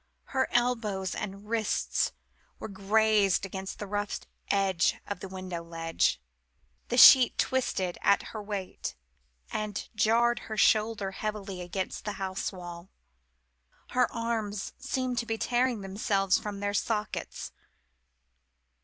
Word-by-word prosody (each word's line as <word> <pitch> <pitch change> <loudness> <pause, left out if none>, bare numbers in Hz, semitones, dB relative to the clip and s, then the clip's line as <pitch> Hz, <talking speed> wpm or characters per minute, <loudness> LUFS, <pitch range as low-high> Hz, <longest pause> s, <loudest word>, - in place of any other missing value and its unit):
Her 260 -1 +2
elbows 225 -6 0
and 200 0 -6
wrists 225 -1 0 0.5
were - - -6
grazed 205 0 +2
against 190 0 -6
the 210 - -5
rough 205 +1 -2 0.3
edge 195 -3 +2
of 205 - -5
the 195 - -6
window 185 -2 -6
ledge 165 - 0 0.7
the 245 - -1
sheet 255 0 +9
twisted 190 -9 0
at 200 - +4
her 215 - -4
weight, 200 -3 -5 0.6
and 210 -2 -3
jarred 235 +2 +3
her 215 - -4
shoulder 215 -1 +3
heavily 200 -2 -4
against 180 +2 -4
the 210 - -3
house 190 0 -3
wall. 175 -1 -9 1.0
Her 250 0 +2
arms 225 -3 -3
seemed 255 -2 -1
to 230 - -4
be 225 - -1
tearing 245 -1 +1
themselves 195 0 +1
from 205 -1 -6
their 205 0 -1
sockets. 210 0 -2
205 Hz, 125 wpm, -29 LUFS, 190-225 Hz, 1.0 s, sheet